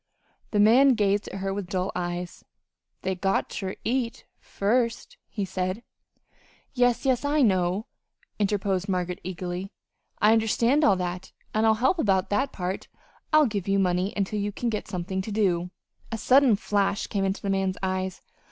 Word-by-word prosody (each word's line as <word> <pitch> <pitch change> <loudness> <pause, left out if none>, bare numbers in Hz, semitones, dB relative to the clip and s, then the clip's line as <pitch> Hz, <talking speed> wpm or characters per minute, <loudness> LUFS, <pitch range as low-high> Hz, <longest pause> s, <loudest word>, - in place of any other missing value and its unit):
The 210 - 0
man 250 +6 +6
gazed 205 -1 +1
at 195 - -6
her 195 0 -1
with 195 -2 -5
dull 185 0 -1
eyes. 175 0 -4 0.6
"They 190 - 0
got 195 +1 0
ter 190 0 -4
eat 245 -1 -2
first," 230 +3 -1
he 205 -3 -3
said. 185 +4 -3 0.9
"Yes, 245 0 +2
yes, 260 -1 +2
I 290 0 +2
know," 185 -1 +1 0.5
interposed 195 -2 0
Margaret, 180 -1 -2
eagerly. 180 +1 -5 0.5
"I 210 +1 +5
understand 230 +6 +2
all 200 - +5
that, 180 0 -4 0.2
and 220 +1 +2
I'll 220 - +5
help 260 +10 +1
about 195 -7 +1
that 270 +7 +1
part. 185 0 -4 0.4
I'll 310 -1 +6
give 205 -6 -3
you 195 0 +2
money 185 0 +1
until 205 +1 -1
you 205 +1 -1
get 220 0 -3
something 190 0 -3
to 210 - -6
do." 180 -4 +1 0.4
A 225 - -2
sudden 260 0 +5
flash 200 -1 0
came 200 -2 -2
into 195 0 -2
the 200 - 0
man's 195 -1 0
eyes. 185 0 -2
200 Hz, 160 wpm, -26 LUFS, 185-225 Hz, 0.9 s, man